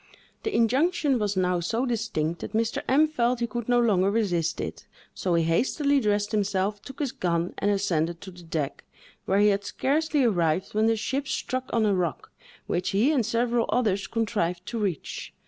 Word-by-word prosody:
The 435 Hz, -, -3 dB
injunction 270 Hz, -, +2 dB
was 205 Hz, -2 st, -1 dB
now 180 Hz, -1 st, +2 dB
so 225 Hz, +9 st, -1 dB
distinct 215 Hz, -9 st, -2 dB
that -, -, -6 dB
Mr. 225 Hz, +1 st, 0 dB
M—— 285 Hz, +4 st, +5 dB
felt 245 Hz, -5 st, 0 dB
he 235 Hz, -, +1 dB
could 235 Hz, +1 st, -5 dB
no 245 Hz, 0 st, +4 dB
longer 200 Hz, -5 st, +3 dB
resist 175 Hz, -7 st, 0 dB
it; -, -, -6 dB, 0.3 s
so 180 Hz, -2 st, -1 dB
he 165 Hz, -, +3 dB
hastily 275 Hz, -, +2 dB
dressed 205 Hz, -3 st, 0 dB
himself, 205 Hz, -1 st, 0 dB
took 270 Hz, +5 st, -11 dB
his 280 Hz, -5 st, -1 dB
gun, 170 Hz, -1 st, -1 dB
and 205 Hz, -, +1 dB
ascended 175 Hz, -5 st, 0 dB
to 190 Hz, -, -9 dB
the 180 Hz, 0 st, -14 dB
deck, 160 Hz, -4 st, -4 dB, 0.4 s
where 195 Hz, -, +1 dB
he 205 Hz, +1 st, +5 dB
had 200 Hz, 0 st, +1 dB
scarcely 295 Hz, +6 st, 0 dB
arrived, 175 Hz, -6 st, +1 dB
when 215 Hz, +1 st, +2 dB
the 225 Hz, -, +3 dB
ship 265 Hz, +6 st, -2 dB
struck 255 Hz, -1 st, -3 dB
on 225 Hz, -2 st, +2 dB
a 205 Hz, -, +3 dB
rock, 180 Hz, -4 st, -2 dB, 0.3 s
which 180 Hz, +1 st, -1 dB
he 220 Hz, +10 st, +3 dB
and 250 Hz, -8 st, +1 dB
several 235 Hz, 0 st, +1 dB
others 205 Hz, -5 st, +1 dB
contrived 195 Hz, -6 st, -1 dB
to 235 Hz, -, -4 dB
reach. 190 Hz, -8 st, -4 dB
210 Hz, 190 wpm, -26 LUFS, 180-240 Hz, 0.4 s, M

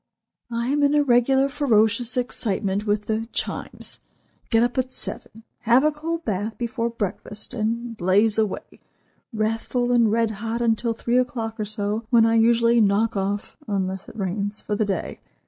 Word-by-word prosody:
"I 235 Hz, +1 st, -2 dB
am 290 Hz, +1 st, +1 dB
in 285 Hz, +1 st, +3 dB
a 295 Hz, -, +4 dB
regular 265 Hz, +1 st, +3 dB
ferocious 240 Hz, -4 st, +1 dB
excitement 205 Hz, -4 st, -1 dB
with 210 Hz, 0 st, 0 dB
the 220 Hz, +1 st, -2 dB
Chimes; -, -, -3 dB, 0.5 s
get 225 Hz, 0 st, +4 dB
up 245 Hz, 0 st, 0 dB
at 255 Hz, 0 st, -1 dB
seven; 225 Hz, -3 st, -3 dB, 0.2 s
have 240 Hz, +4 st, +4 dB
a 305 Hz, -, +4 dB
cold 330 Hz, +2 st, -4 dB
bath 210 Hz, +1 st, -2 dB
before 235 Hz, 0 st, -2 dB
breakfast; 210 Hz, 0 st, -5 dB
and 230 Hz, +1 st, -2 dB
blaze 205 Hz, +3 st, +3 dB
away, 215 Hz, -3 st, -3 dB, 0.5 s
wrathful 225 Hz, +3 st, -1 dB
and 235 Hz, -3 st, +4 dB
red 225 Hz, 0 st, +2 dB
hot, 225 Hz, +2 st, -4 dB
until 230 Hz, 0 st, +1 dB
three 240 Hz, +2 st, +1 dB
o'clock 230 Hz, -3 st, -3 dB
or 215 Hz, -, -1 dB
so, 215 Hz, +1 st, -3 dB
when 230 Hz, -2 st, +5 dB
I 225 Hz, -, +3 dB
usually 230 Hz, +1 st, +4 dB
knock 210 Hz, +2 st, +2 dB
off 200 Hz, +1 st, -2 dB
(unless 190 Hz, -2 st, -2 dB
it -, -, -13 dB
rains) 205 Hz, +1 st, -2 dB
for 210 Hz, -, -3 dB
the 215 Hz, -, +1 dB
day. 195 Hz, -3 st, -3 dB
225 Hz, 165 wpm, -23 LUFS, 210-240 Hz, 0.5 s, when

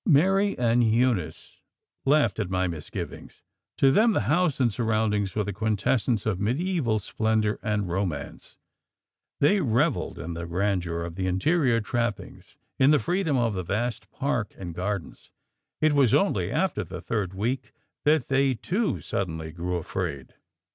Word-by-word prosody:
Mary 195 Hz, +6 st, +3 dB
and 120 Hz, 0 st, +3 dB
Eunice 110 Hz, -8 st, 0 dB, 0.4 s
laughed 140 Hz, -6 st, +3 dB
at -, -, -1 dB
my 95 Hz, 0 st, 0 dB
misgivings; 80 Hz, -3 st, -7 dB, 0.3 s
to 135 Hz, -, +5 dB
them 220 Hz, -, +4 dB
the -, -, +1 dB
house 165 Hz, -2 st, +1 dB
and 120 Hz, -5 st, +2 dB
surroundings 110 Hz, -4 st, 0 dB
were 105 Hz, -, +1 dB
the 100 Hz, 0 st, -4 dB
quintessence 110 Hz, +2 st, 0 dB
of 105 Hz, -5 st, 0 dB
mediæval 125 Hz, -, 0 dB
splendour 110 Hz, +1 st, 0 dB
and 105 Hz, -2 st, -1 dB
romance; 85 Hz, -6 st, -4 dB, 0.8 s
they 195 Hz, +8 st, +4 dB
revelled 125 Hz, -, +1 dB
in 85 Hz, -, -5 dB
the 85 Hz, 0 st, -5 dB
grandeur 90 Hz, -2 st, -1 dB
of 85 Hz, -1 st, -6 dB
the 95 Hz, +1 st, -2 dB
interior 125 Hz, -, +2 dB
trappings, 115 Hz, -1 st, -4 dB, 0.2 s
in 130 Hz, -, +6 dB
the 150 Hz, -, +6 dB
freedom 165 Hz, -, 0 dB
of 115 Hz, -3 st, +1 dB
the 95 Hz, -, -2 dB
vast 100 Hz, +2 st, -3 dB
park 120 Hz, -6 st, -2 dB
and 90 Hz, -3 st, -6 dB
gardens; 95 Hz, -2 st, -4 dB, 0.5 s
it 155 Hz, -1 st, +4 dB
was 135 Hz, -6 st, +4 dB
only 195 Hz, -, +1 dB
after 190 Hz, 0 st, 0 dB
the 90 Hz, +1 st, -7 dB
third 95 Hz, +1 st, -3 dB
week 120 Hz, +7 st, -2 dB, 0.3 s
that 150 Hz, -3 st, +3 dB
they, 135 Hz, -1 st, +2 dB
too, 195 Hz, -, -1 dB
suddenly 80 Hz, -4 st, -3 dB
grew 90 Hz, +2 st, -3 dB
AFRAID. 80 Hz, -5 st, -4 dB
110 Hz, 150 wpm, -26 LUFS, 95-135 Hz, 0.8 s, in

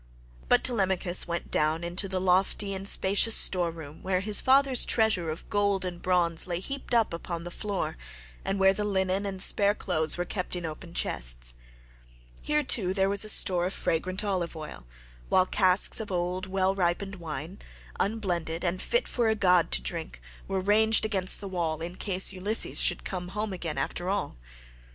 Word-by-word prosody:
But -, -, +4 dB
Telemachus 190 Hz, -7 st, +1 dB
went 170 Hz, 0 st, -5 dB
down 155 Hz, +2 st, 0 dB
into 175 Hz, +3 st, 0 dB
the 185 Hz, -1 st, -2 dB
lofty 190 Hz, +2 st, +1 dB
and 195 Hz, +1 st, -4 dB
spacious 200 Hz, +4 st, +4 dB
store 180 Hz, -2 st, +4 dB
room 160 Hz, -2 st, -11 dB
where 185 Hz, -1 st, -1 dB
his 205 Hz, 0 st, +1 dB
father's 265 Hz, -1 st, +4 dB
treasure 215 Hz, -7 st, +1 dB
of 155 Hz, -, -6 dB
gold 200 Hz, -2 st, 0 dB
and 175 Hz, -1 st, -6 dB
bronze 175 Hz, -2 st, +2 dB
lay 175 Hz, -1 st, -2 dB
heaped 275 Hz, +4 st, -4 dB
up 225 Hz, -6 st, +2 dB
upon 170 Hz, 0 st, -5 dB
the 175 Hz, -, -8 dB
floor, 200 Hz, -, -4 dB, 0.5 s
and 195 Hz, -, -2 dB
where 190 Hz, 0 st, +4 dB
the 210 Hz, -, -3 dB
linen 190 Hz, 0 st, 0 dB
and 190 Hz, -1 st, -5 dB
spare 200 Hz, +2 st, +3 dB
clothes 160 Hz, -6 st, 0 dB
were 175 Hz, -, -2 dB
kept 185 Hz, -1 st, -4 dB
in 175 Hz, -1 st, -5 dB
open 165 Hz, +2 st, -8 dB
chests. -, -, -1 dB, 0.9 s
Here, 300 Hz, 0 st, 0 dB
too, 190 Hz, -8 st, +2 dB
there 195 Hz, -1 st, +2 dB
was 200 Hz, +1 st, +1 dB
a 215 Hz, -, -4 dB
store 180 Hz, -3 st, +4 dB
of 190 Hz, -, -4 dB
fragrant 185 Hz, +5 st, -2 dB
olive 185 Hz, -5 st, -2 dB
oil, 65 Hz, -, -9 dB, 0.4 s
while 185 Hz, -, +4 dB
casks 185 Hz, +1 st, +3 dB
of 215 Hz, -3 st, -6 dB
old, 180 Hz, +1 st, -3 dB
well 190 Hz, 0 st, 0 dB
ripened 195 Hz, +2 st, -2 dB
wine, 165 Hz, +2 st, -7 dB, 0.4 s
unblended 180 Hz, -6 st, -2 dB
and 180 Hz, +1 st, -2 dB
fit 485 Hz, +1 st, 0 dB
for 240 Hz, -2 st, -1 dB
a 220 Hz, -, +2 dB
god 180 Hz, -, +3 dB
to -, -, 0 dB
drink, -, -, -6 dB, 0.3 s
were 195 Hz, -, -2 dB
ranged 220 Hz, +3 st, +4 dB
against 190 Hz, -4 st, +1 dB
the 200 Hz, -, -6 dB
wall 170 Hz, -4 st, -2 dB
in 170 Hz, +2 st, -6 dB
case 190 Hz, -1 st, +1 dB
Ulysses 200 Hz, +4 st, +2 dB
should -, -, +2 dB
come 180 Hz, -1 st, -5 dB
home 210 Hz, -1 st, -2 dB
again 165 Hz, -5 st, -5 dB
after 175 Hz, +6 st, -2 dB
all. 200 Hz, -, -2 dB
185 Hz, 185 wpm, -27 LUFS, 175-200 Hz, 0.9 s, But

